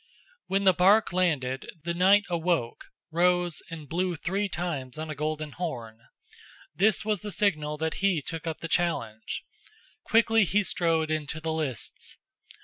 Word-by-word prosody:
When 195 +1 +1
the 190 -1 +6
bark 195 +4 +4
landed, 145 -8 0
the 170 +1 -1
knight 190 +4 +5
awoke, 170 -8 -1 0.3
rose, 175 0 +2
and 160 -3 -8
blew 180 +3 -1
three 195 +6 -1
times 155 -7 -4
on 155 0 -4
a - - -5
golden 155 +1 -3
horn. 120 -11 -5 0.7
This 200 +7 +2
was 215 -2 +1
the 210 +2 -6
signal 155 -8 0
that 160 +1 -1
he 195 -4 +3
took 165 +3 -6
up 160 - -4
the 165 - -3
challenge. 135 -12 -1 0.6
Quickly 225 -1 +4
he 205 +3 +2
strode 165 -4 +1
into 155 0 -2
the 160 0 -2
lists. 150 -6 -4
165 Hz, 150 wpm, -28 LUFS, 155-185 Hz, 0.7 s, the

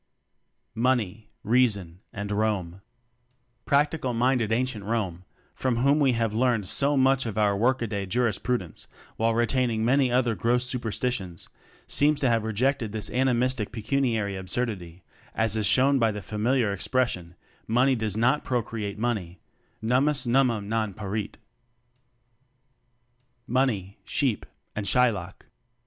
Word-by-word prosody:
Money, 115 -3 0
Reason 100 -7 +1
and 100 0 -5
Rome. 100 -4 -1 0.8
Practical 140 -3 +1
minded 120 -2 +1
ancient 120 -2 0
Rome, 95 -5 -3 0.3
from 130 -2 -1
whom 140 +5 +3
we 135 -3 +3
have 115 -2 0
learned 115 -4 +1
so 140 +6 +2
much 135 -1 +3
of 110 - -4
pur 105 -2 +2
work 120 +4 +1
a - - 0
day 100 -2 -3
jurispru 120 +2 0
dence 90 -7 -7 0.3
while 115 0 +1
retaining 120 -1 +1
many 130 +1 +3
other 125 -2 +2
gross 120 +3 +1
superstitions 120 -6 -3 0.4
seems 150 0 +3
to 130 - +3
have 115 -2 +2
rejected 115 +1 0
this 110 -2 -2
animistic 125 -3 +1
pecuniary 110 -3 -1
absurdity, 95 -3 -4 0.3
as 110 -1 +2
is 110 -2 +1
shown 135 +1 +4
by 115 -2 +3
the 105 -2 -5
familiar 110 +2 0
expression: 95 -5 -1 0.3
Money 125 +4 +3
does 110 -3 -2
not 130 +6 +2
procreate 110 -4 -3
money 105 -7 -2 0.5
"Nummus 130 +4 +2
nummum 120 -4 +2
non 110 -2 -1
parit/' 105 0 -4 2.1
Money, 115 -7 -1
Sheep 130 -7 -1 0.3
and 105 -1 -3
Shylock. 105 -6 +1
115 Hz, 130 wpm, -26 LUFS, 105-125 Hz, 2.1 s, shown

